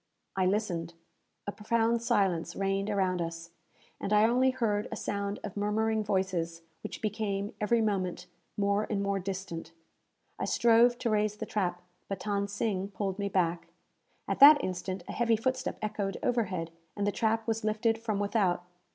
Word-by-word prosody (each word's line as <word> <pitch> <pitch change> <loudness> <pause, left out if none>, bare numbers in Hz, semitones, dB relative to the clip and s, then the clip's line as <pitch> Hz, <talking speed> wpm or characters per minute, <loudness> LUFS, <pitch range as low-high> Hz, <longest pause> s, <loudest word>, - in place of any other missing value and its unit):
I 190 -1 +2
listened. 175 -5 -1 0.5
A 205 - -2
profound 230 +2 +1
silence 195 -8 +1
reigned 195 +1 0
around 190 -3 +1
us, 165 0 -5 0.5
and - - -4
I 210 0 +5
only 250 +3 +4
heard 225 -5 0
a - - -3
sound 200 0 -3
of 205 - -6
murmuring 215 +1 +1
voices, 185 -5 -1 0.2
which - - -7
became, 205 -1 -2
every 225 +2 +3
moment, 185 -4 -1 0.3
more 200 +1 +1
and 200 -2 0
more 200 0 0
distant. 185 -3 -5 0.7
I - - -1
strove 235 +1 +4
to 235 - -1
raise 210 0 +1
the - - -4
trap, 180 -4 -2 0.2
but 195 - -4
Than 200 -1 -1
Sing 200 -1 -1
pulled 200 -1 -3
me 200 0 -1
back. 175 -3 0 0.6
At - - -2
that 290 +1 +9
instant, 185 0 -3
a - - -4
heavy 235 -1 +2
footstep 260 +3 -1
echoed 210 -2 -2
overhead, 185 -9 0 0.3
and 205 - 0
the 205 - +2
trap 225 +1 0
was 225 -1 -1
lifted 220 +1 +1
from 220 -3 -2
without. 200 -4 +1
205 Hz, 165 wpm, -30 LUFS, 190-220 Hz, 0.7 s, that